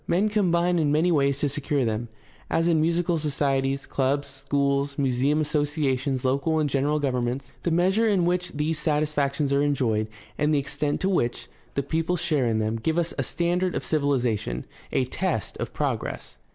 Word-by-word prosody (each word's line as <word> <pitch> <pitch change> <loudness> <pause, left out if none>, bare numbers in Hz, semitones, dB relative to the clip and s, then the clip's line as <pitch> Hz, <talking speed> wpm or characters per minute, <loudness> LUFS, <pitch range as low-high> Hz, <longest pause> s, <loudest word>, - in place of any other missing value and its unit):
Men 195 +5 +2
combine 175 -4 +2
in 150 -2 +2
many 160 +4 +3
ways 140 -3 +2
to 145 - +2
secure 140 -1 0
them, 110 +1 -2 0.4
as 165 +1 +1
in 165 -2 +3
musical 170 +1 +1
societies, 140 -2 0
clubs, 140 +1 0
schools, 140 0 -1
museum 135 +2 +1
associations, 145 -3 0
local 140 +5 +1
and 155 -1 +2
general 145 +2 +1
govern 125 -4 0
ments. 125 +2 -4
The - - 0
measure 190 +7 +3
in 195 -5 +2
which 180 +1 0
these 150 +2 -1
satisfactions 150 -2 0
are 140 - +3
enjoyed 120 -7 +1 0.3
and 150 +1 +2
the - - +3
extent 145 +1 -1
to 190 - +1
which 120 -11 -1 0.3
the 140 - 0
people 165 +5 0
share 155 -7 +1
in 110 -1 +1
them 110 +1 0
give 160 +9 -1
us 170 -1 0
a - - +2
standard 175 +1 0
of - - -3
civilization, 125 - 0 0.3
a 130 - +1
test 160 - -2
of - - -4
progress. - - -3
145 Hz, 180 wpm, -25 LUFS, 135-165 Hz, 0.4 s, many